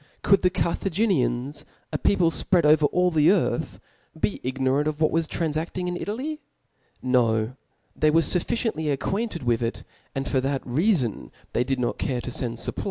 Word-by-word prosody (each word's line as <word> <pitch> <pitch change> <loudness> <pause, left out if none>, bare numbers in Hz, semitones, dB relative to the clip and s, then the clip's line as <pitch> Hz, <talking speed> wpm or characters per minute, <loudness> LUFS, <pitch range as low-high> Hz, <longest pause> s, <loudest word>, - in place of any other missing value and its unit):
Could 195 -1 +4
the 180 - +4
Carthaginians, 160 - 0 0.3
a - - +1
people 175 -4 +3
fpread 175 -1 +2
over 150 0 +5
all 180 +2 +2
the 155 -1 +3
earthi 175 -3 +1 0.4
be 200 - -1
ignorant 130 +3 0
of 155 0 -2
what 155 - +3
was 165 -1 +1
tranfafting 165 +3 -2
in 180 - -2
Italy? 265 - -4 0.6
No: 120 -2 +2 0.4
^hey 155 0 +4
were 165 +2 +5
fufficiently 170 -2 0
acquainted 185 - -2
with 120 -2 +2
)C, 115 -1 -3 0.3
ai)d 135 0 -2
for 130 - +1
that 135 +1 -1
reafon 135 - 0 0.2
they 120 - +2
did 135 +1 -1
not 120 - -1
cafe 125 -3 -1
tp 125 +2 -4
fend 120 -2 -3
fupplies - - 0
to - - -1
Hannibal. - - -8
155 Hz, 175 wpm, -25 LUFS, 130-180 Hz, 0.6 s, over